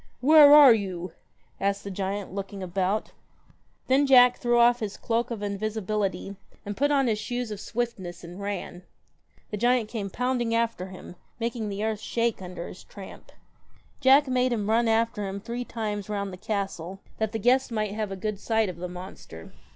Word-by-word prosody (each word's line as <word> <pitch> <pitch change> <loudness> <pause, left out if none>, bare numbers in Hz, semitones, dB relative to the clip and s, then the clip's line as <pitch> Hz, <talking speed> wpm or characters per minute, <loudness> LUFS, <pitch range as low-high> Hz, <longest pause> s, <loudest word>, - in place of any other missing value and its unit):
'Where 295 +2 +8
are 290 -4 +10
you?' 185 -4 -3 0.5
asked 200 0 -1
the 200 - -6
giant 195 0 -4
looking 195 0 -5
about. 185 +3 -1 0.7
Then 275 +2 +3
Jack 250 -2 +6
threw 240 0 +2
off 240 +1 +5
his 210 -4 -4
cloak 235 +1 -1
of 225 -4 -5
invisibility, 205 -1 -2 0.3
and 205 0 -4
put 285 +5 +1
on 280 -2 +3
his 220 -3 0
shoes 245 +1 -4
of 210 - -5
swiftness 205 -8 -4
and 175 +3 -9
ran. 200 -3 -5 0.7
The 210 - -3
giant 240 0 +2
came 215 -4 -4
pounding 245 +1 -1
after 230 -5 -1
him, 185 -1 -11 0.2
making 230 -2 -3
the 200 +1 -4
earth 220 -1 -1
shake 230 -1 -1
under 180 -2 -7
his - - -11
tramp. 195 -2 -12 0.7
Jack 270 +2 +5
made 255 0 +1
him 215 -2 -1
run 230 +1 +3
after 225 -2 +1
him 195 +1 -5
three 235 +4 -5
times 210 -4 -4
round 200 -2 -3
the - - -8
castle, 195 -2 -4 0.2
that 220 -1 0
the 225 - -2
guests 250 +5 +2
might 215 -3 -2
have 215 -2 -3
a - - -3
good 200 +1 -4
sight 220 -2 +1
of 180 - -7
the 180 +1 -5
monster. 180 - -10
215 Hz, 180 wpm, -26 LUFS, 195-240 Hz, 0.7 s, are